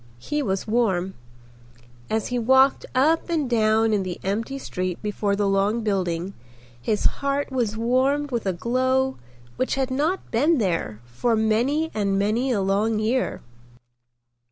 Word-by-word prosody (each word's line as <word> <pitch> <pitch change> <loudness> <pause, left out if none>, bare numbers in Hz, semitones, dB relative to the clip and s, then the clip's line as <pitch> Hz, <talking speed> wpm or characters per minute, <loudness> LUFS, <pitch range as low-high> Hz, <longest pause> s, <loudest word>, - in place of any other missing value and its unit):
He 295 - -3
was 195 -7 -2
warm. 195 -5 0 1.0
As 220 0 -1
he 245 -1 -1
walked 265 +3 +4
up 315 +7 +2
and 315 -5 0
down 220 -1 +2
in 205 - +2
the 185 -2 -5
empty 225 +8 -2
street 185 -8 -4
before 205 -1 -1
the 200 0 0
long 200 +4 +1
building 185 -3 -1 0.5
his 210 - -1 0.2
heart 280 0 -1
was 235 -5 -1
warmed 265 +5 +1
with 235 -4 -2
a - - +2
glow 260 +6 0 0.4
which 255 - 0
had 265 -1 -1
not 310 +8 -1
been 295 +8 +3
there 170 - -1
for 120 - 0
many 240 +9 +1
and 200 -2 0
many 220 +6 +1
a 210 -5 +1
long 205 +3 +1
year. 230 +4 -1
225 Hz, 150 wpm, -24 LUFS, 200-265 Hz, 1.0 s, walked